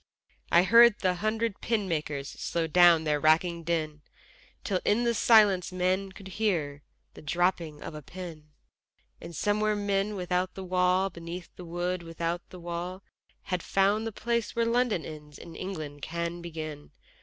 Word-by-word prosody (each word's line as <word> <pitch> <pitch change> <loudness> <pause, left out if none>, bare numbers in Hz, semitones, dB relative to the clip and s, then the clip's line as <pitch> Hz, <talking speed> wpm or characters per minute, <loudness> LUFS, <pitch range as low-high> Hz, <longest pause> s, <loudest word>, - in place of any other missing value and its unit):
I 170 - +6
heard 230 +3 +7
the 185 -2 +1
hundred 215 +3 -2
pin 220 -4 0
makers 150 -4 -2
Slow 170 +3 -2
down 170 0 +6
their 150 -1 +1
racking 165 +2 +2
din, 155 -3 -2 0.6
Till 190 -3 0
in 220 +4 +2
the 235 0 +2
stillness 205 -6 +5
men 185 +2 0
could 190 0 -11
hear 155 -10 0 0.3
The - - -12
dropping 170 -1 -1
of - - -7
the 150 - -7
pin: 165 -2 -9 0.7
And 170 - -9
somewhere 210 +4 +1
men 205 0 0
without 180 0 -1
the 190 - -6
wall, 185 +1 +2
beneath 170 +1 -8
the 180 - -9
wood, 175 +2 -2
without 170 +1 -3
the 185 - -11
wall, 175 +2 -5 0.4
Had 180 -2 -2
found 200 +5 +1
the - - -3
place 235 +1 -2
where 230 0 +2
London 230 -6 +1
ends 150 -2 -10
and 165 - -11
England 155 -7 -6
can 170 +2 -4
begin. 155 -3 -7
180 Hz, 160 wpm, -28 LUFS, 165-195 Hz, 0.7 s, heard